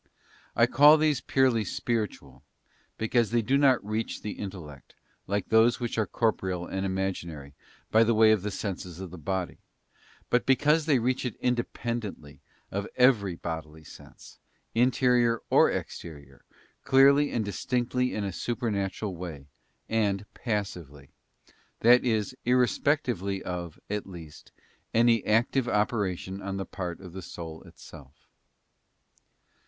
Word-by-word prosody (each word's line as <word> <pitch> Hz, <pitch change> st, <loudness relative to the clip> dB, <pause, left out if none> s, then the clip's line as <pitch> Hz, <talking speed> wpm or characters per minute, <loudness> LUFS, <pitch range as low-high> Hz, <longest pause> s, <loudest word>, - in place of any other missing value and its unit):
I 115 Hz, -, +5 dB
call 145 Hz, +5 st, +7 dB
these 150 Hz, -4 st, +1 dB
purely 130 Hz, -4 st, +2 dB
spiritual, 110 Hz, +2 st, -3 dB, 0.6 s
because 110 Hz, 0 st, +1 dB
they 115 Hz, 0 st, +1 dB
do 130 Hz, +6 st, +1 dB
not 135 Hz, -6 st, +3 dB
reach 110 Hz, +2 st, -3 dB
the 105 Hz, -, -3 dB
intellect, 85 Hz, -10 st, -9 dB, 0.3 s
like 100 Hz, 0 st, -2 dB
those 110 Hz, +2 st, +4 dB
which 120 Hz, -2 st, -3 dB
are 110 Hz, -, +1 dB
corporeal 95 Hz, -6 st, -1 dB
and 95 Hz, +1 st, -4 dB
imaginary, 85 Hz, -7 st, -4 dB, 0.4 s
by 110 Hz, +1 st, +6 dB
the 115 Hz, 0 st, +2 dB
way 110 Hz, 0 st, +6 dB
of 110 Hz, -3 st, +2 dB
the 105 Hz, -, -3 dB
senses 95 Hz, -4 st, -5 dB
of 95 Hz, -3 st, -7 dB
the 90 Hz, -, -9 dB
body; 95 Hz, +2 st, -3 dB, 0.7 s
but 125 Hz, -, +2 dB
because 150 Hz, +4 st, +3 dB
they 145 Hz, -4 st, +4 dB
reach 125 Hz, +2 st, 0 dB
it 125 Hz, -4 st, -3 dB
independently 120 Hz, -9 st, -3 dB, 0.3 s
of 100 Hz, +1 st, -3 dB
every 115 Hz, -8 st, +3 dB
bodily 80 Hz, -2 st, -6 dB
sense, 80 Hz, -, -15 dB, 0.3 s
interior 120 Hz, -1 st, +3 dB
or -, -, +6 dB
exterior, 70 Hz, -5 st, -7 dB, 0.4 s
clearly 140 Hz, +2 st, +5 dB
and 110 Hz, -3 st, -1 dB
distinctly 125 Hz, +4 st, -1 dB
in 105 Hz, -, -2 dB
a 100 Hz, -2 st, -3 dB
supernatural 105 Hz, -4 st, -3 dB
way, 80 Hz, -6 st, -7 dB, 0.4 s
and 105 Hz, -3 st, 0 dB
passively; 90 Hz, -, -5 dB, 0.7 s
that 120 Hz, +2 st, +6 dB
is, 110 Hz, 0 st, 0 dB
irrespectively 125 Hz, -, +1 dB
of, 85 Hz, -3 st, -5 dB
at 105 Hz, -1 st, -4 dB
least, 85 Hz, -5 st, -12 dB, 0.4 s
any 115 Hz, 0 st, +4 dB
active 120 Hz, +4 st, +2 dB
operation 100 Hz, -3 st, -1 dB
on 95 Hz, 0 st, -4 dB
the 95 Hz, -, -3 dB
part 90 Hz, -3 st, -6 dB
of 90 Hz, -3 st, -11 dB
the 95 Hz, -, -7 dB
soul 80 Hz, -2 st, -8 dB
itself. 70 Hz, 0 st, -14 dB
105 Hz, 135 wpm, -27 LUFS, 90-120 Hz, 0.7 s, call